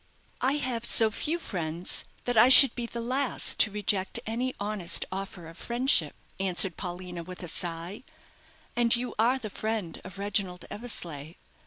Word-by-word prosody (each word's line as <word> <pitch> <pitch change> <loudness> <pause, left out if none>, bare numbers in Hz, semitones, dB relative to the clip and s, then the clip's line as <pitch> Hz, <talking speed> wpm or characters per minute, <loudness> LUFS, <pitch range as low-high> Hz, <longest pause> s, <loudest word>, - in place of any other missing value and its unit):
"I 265 +2 +3
have 255 -5 -2
so 225 -2 +4
few 310 +9 -2
friends 170 - -3 0.2
that 245 - -1
I 225 +3 +7
should 270 +1 +10
be 240 -1 -4
the 235 - -5
last 255 +3 +1
to - - +5
reject 200 -2 -1
any 245 +4 -3
honest 200 -4 0
offer 190 -2 -6
of 165 +2 -13
friendship," 240 - +2 0.2
answered 185 -2 +1
Paulina, 180 -1 -6
with 180 +2 -9
a - - -5
sigh. 170 +3 -4 0.7
"And 235 -1 +3
you 245 +1 -3
are 240 +4 +3
the 215 -5 -7
friend 215 -7 -4
of 185 +2 -11
Reginald 200 -3 -1
Eversleigh. 170 -9 -5
205 Hz, 160 wpm, -28 LUFS, 180-240 Hz, 0.7 s, should